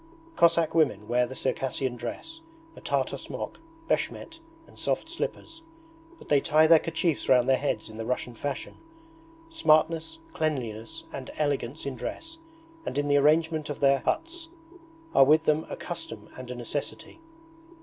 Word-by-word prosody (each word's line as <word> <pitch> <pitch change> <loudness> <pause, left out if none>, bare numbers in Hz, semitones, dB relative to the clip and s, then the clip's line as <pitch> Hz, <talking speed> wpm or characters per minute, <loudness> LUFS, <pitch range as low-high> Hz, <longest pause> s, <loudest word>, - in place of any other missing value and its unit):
Cossack 170 -1 +4
women 135 -11 +2
wear 125 +1 +2
the 130 - -8
Circassian 130 -1 -1
dress 125 - -6 0.3
a - - -12
Tartar - - -1
smock, - - -6 0.3
beshmet, 325 0 -2 0.3
and - - -17
soft - - -1
slippers 330 0 -5 0.6
but - - -15
they 145 -2 +4
tie 155 0 +5
their 160 0 +8
kerchiefs 165 -1 -1
round 125 -1 +5
their 135 - +5
heads 135 -6 -1
in 110 - -10
the 115 - -4
Russian 125 -1 -2
fashion. 140 +4 -5 0.7
Smartness, 165 - +3 0.2
cleanliness 145 0 -3
and 135 -2 -6
elegance 145 -2 -1
in 140 -2 -3
dress 325 - -6 0.4
and - - -4
in 145 0 0
the 145 - +5
arrangement 155 +1 +3
of 145 - -4
their 140 0 +4
huts, 330 - -2 0.6
are - - +8
with 155 +4 +5
them 155 0 +1
a - - -4
custom - - -7
and 130 -1 -9
a 125 - -4
necessity. 140 - -5
145 Hz, 155 wpm, -28 LUFS, 130-165 Hz, 0.7 s, their